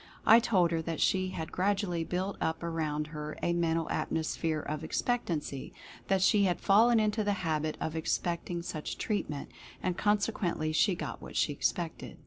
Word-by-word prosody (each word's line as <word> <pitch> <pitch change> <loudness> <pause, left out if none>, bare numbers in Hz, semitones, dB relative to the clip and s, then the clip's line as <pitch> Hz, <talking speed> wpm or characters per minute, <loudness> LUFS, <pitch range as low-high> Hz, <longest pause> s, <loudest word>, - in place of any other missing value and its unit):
T 225 - +9
told 185 -7 +3
her 165 -1 0
that 165 -1 -4
she 185 -1 +2
had 160 -3 -5
gradually 190 -3 0
built 185 +4 -2
up 160 +1 -1
around 155 -3 -1
her 150 0 -5
a 170 - +2
Mental 165 -1 +1
Atmosphere 160 0 -1
of 150 +1 -4
Expectancy 160 - -2 0.2
— - - -18
that 190 -1 +2
she 200 +1 +5
had 175 -3 +1
fallen 225 +4 +5
into 215 0 +1
the 205 0 +1
habit 155 -1 0
of 160 - -3
expecting 170 +1 -2
such 155 -3 -5
treatment, 170 -10 -3 0.3
and 180 -1 -2
consequently 200 -6 +1
she 180 +4 +3
got 180 - -5
what - - -10
she - - +2
expected. - - -2
170 Hz, 170 wpm, -31 LUFS, 160-200 Hz, 0.3 s, T